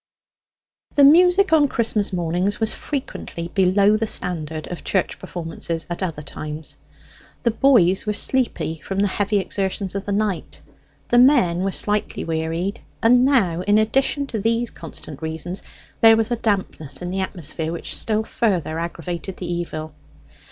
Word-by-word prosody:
The 285 - +6
music 360 +5 +6
on 300 -2 +5
Christmas 220 -5 +1
mornings 180 +3 -1
was 220 -1 +2
frequently 215 - -5
below 195 +3 +3
the 220 0 -1
standard 160 -5 -3
of 175 - -6
church 190 -3 -1
performances 165 -2 -5
at 175 - -4
other 165 -5 -3
times. 150 +1 -5 0.7
The 235 - +3
boys 215 -7 +4
were 210 - +1
sleepy 230 -9 +1
from 195 - -5
the 205 +1 +3
heavy 205 +2 0
exertions 195 -1 -2
of 200 0 -4
the - - -1
night; 200 -3 -2 0.5
the 240 - +5
men 245 -10 +5
were 195 +1 0
slightly 210 +2 -1
wearied; 165 +4 -2 0.2
and 245 +2 +6
now, 210 -11 +2
in 205 +3 +3
addition 270 +6 +1
to 235 -5 -4
these 230 +3 0
constant 155 -2 -9
reasons, 160 +3 -4 0.4
there 225 0 +8
was 225 +1 0
a - - +2
dampness 190 - -2
in 175 - -4
the 190 - -2
atmosphere 165 -3 -3
that 170 - -7
still 220 -1 0
further 180 -9 -1
aggravated 170 +2 -5
the 175 -1 -4
evil. 155 -3 -5
195 Hz, 155 wpm, -22 LUFS, 170-225 Hz, 0.7 s, there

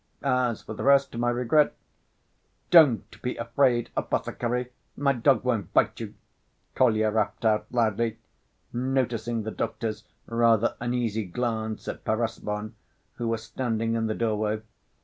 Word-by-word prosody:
As 125 -3 +1
for 110 - -7
the - - -7
rest, 140 0 +4
to 115 - -6
my 120 0 +2
regret—" 125 +5 +2 1.0
"Don't 155 -10 +5
be 125 - -2
afraid, 120 0 +1
apothecary, 125 +1 -2 0.3
my 140 0 +2
dog 130 +2 +3
won't 115 -7 -1
bite - - +3
you," - - -7 0.6
Kolya 110 -4 +3
rapped 105 +1 -1
out 110 -1 +2
loudly, 115 -1 0 0.6
noticing 120 -3 -1
the 110 - -4
doctor's 110 -1 -3 0.2
rather 115 -1 +3
uneasy 120 -3 -1
glance 110 +2 -3
at - - -5
Perezvon, 110 -1 -2 0.4
who 120 - -2
was 115 -1 -1
standing 115 -1 -2
in 115 -1 0
the 110 - -1
doorway. 110 -1 -1
115 Hz, 135 wpm, -26 LUFS, 110-125 Hz, 1.0 s, Don't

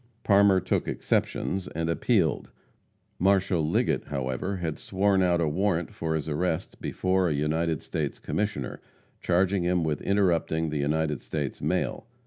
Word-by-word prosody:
Parmer 100 -2 +5
took - - -1
exceptions 95 -1 -1
and 80 +1 -3
appealed. 85 - +1 0.7
Marshal 95 -2 +3
Liggett, 75 - +1
however, 70 +8 -3
had 80 -4 -3
sworn 95 0 +1
out 90 -2 +3
a 80 - +1
warrant 85 +1 0
for 80 -1 -2
his 80 0 -3
arrest 80 +3 -2
before 95 -1 +1
a 75 - 0
United 80 +2 0
States - - -3
Commissioner, 105 -1 -3 0.4
charging 95 +2 +2
him 90 0 +1
with 75 -3 -1
interrupting 85 -5 +1
the 75 - -2
United 75 0 0
States 75 -4 -4
mail. 110 - -1
85 Hz, 140 wpm, -27 LUFS, 80-95 Hz, 0.7 s, Parmer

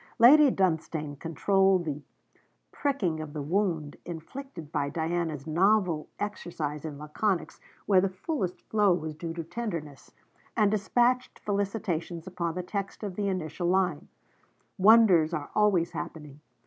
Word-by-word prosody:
Lady 280 +5 +8
Dunstane 160 - -1
controlled 190 +2 +2
the 150 -1 -3 0.7
pricking 210 - -1
of 155 -2 -6
the 150 - -4
wound 165 -3 -1
inflicted 170 - -8
by 145 -3 -1
Diana's 160 -2 -2
novel 180 -1 +2
exercise 165 -8 -4
in 150 -2 -6
laconics 170 +6 -2 0.3
where 190 -3 +5
the 195 - +1
fullest 185 - -3
flow 205 -4 +3
was 155 -2 -4
due 165 +2 -6
to 165 - -4
tenderness, 165 - -6 0.5
and 210 -2 +4
despatched 240 +4 +1
felicitations 195 -5 -2
upon 170 -3 -3
the 180 - -3
text 195 +3 -5
of 200 -3 -4
the 205 0 -1
initial 175 -2 -2
line: 180 -4 +1 0.7
'Wonders 190 -6 +6
are 145 -2 -5
always 195 -5 +3
happening.' 150 -3 -7
175 Hz, 135 wpm, -28 LUFS, 155-205 Hz, 0.7 s, Lady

